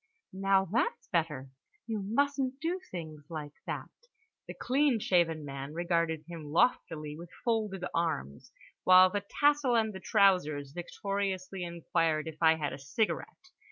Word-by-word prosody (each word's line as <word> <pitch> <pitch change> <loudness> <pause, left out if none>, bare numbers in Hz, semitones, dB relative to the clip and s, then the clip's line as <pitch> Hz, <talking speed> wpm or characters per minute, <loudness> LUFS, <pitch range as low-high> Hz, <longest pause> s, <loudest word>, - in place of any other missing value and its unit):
Now, 195 0 +3
that's 205 +6 -1
better, 150 -6 -1 0.3
you 220 -3 -3
mustn't 270 +5 0
do 340 +4 -1
things 155 -4 -7
like 150 -3 -6
that." - - -4 0.6
The - - -7
clean 270 -2 +2
shaven 165 -6 +1
man 140 +1 -6
regarded 170 -2 0
him 165 -3 -8
loftily 155 -3 +1
with 170 +2 -10 0.2
folded 215 -6 0
arms, 115 - -2 0.3
while 185 0 +8
the 205 0 -2 0.2
tassel 290 -4 +4
and 220 -2 +2
the 190 - -7
trousers 180 -11 +2
victoriously 190 +2 -3
inquired 165 -2 0
if 155 0 -8
I 160 -1 +6
had 150 -2 -3
a - - -7
cigarette? 225 - -3
175 Hz, 140 wpm, -31 LUFS, 155-215 Hz, 0.6 s, while